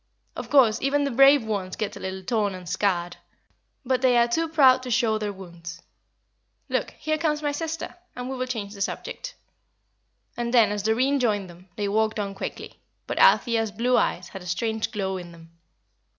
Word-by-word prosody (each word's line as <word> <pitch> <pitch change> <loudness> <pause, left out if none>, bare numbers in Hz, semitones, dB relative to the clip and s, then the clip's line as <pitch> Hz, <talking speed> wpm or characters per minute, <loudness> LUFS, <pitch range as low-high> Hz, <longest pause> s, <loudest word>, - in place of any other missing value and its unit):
Of - - -6
course, 240 -6 +4
even 285 +1 +1
the 280 - -1
brave 275 +1 +6
ones 200 -4 -3
get 215 -2 -3
a - - -9
little 190 0 -5
torn 205 -2 0
and 180 -1 -10
scarred, 175 -2 -1 0.7
but 255 0 +1
they 250 -2 +4
are 235 0 +4
too 325 +7 0
proud 265 -5 +5
to 255 - -7
show 225 -2 +2
their 210 -1 -2
wounds. 170 -3 -10 0.9
Look, - - -1
here 310 0 -1
comes 300 -1 0
my 290 - +1
sister, 325 +2 -4 0.2
and 250 0 -5
we 265 - -4
will 255 0 -3
change 215 -5 -4
the 200 - -9
subject." - - -4 1.0
And 240 0 -2
then, 220 -4 +5
as 205 0 -2
Doreen 255 +7 +2
joined 205 -7 0
them, 180 +2 -18
they 205 -1 -2
walked 215 +1 0
on 200 -1 -3
quickly; 195 - -7 0.3
but - - -3
Althea's 225 -2 +4
blue 240 +4 +1
eyes 175 0 0
had 195 - -9
a 180 - -10
strange 220 +5 -1
glow 190 -3 -2
in 175 -2 -9
them. 165 0 -16
220 Hz, 195 wpm, -25 LUFS, 195-255 Hz, 1.0 s, brave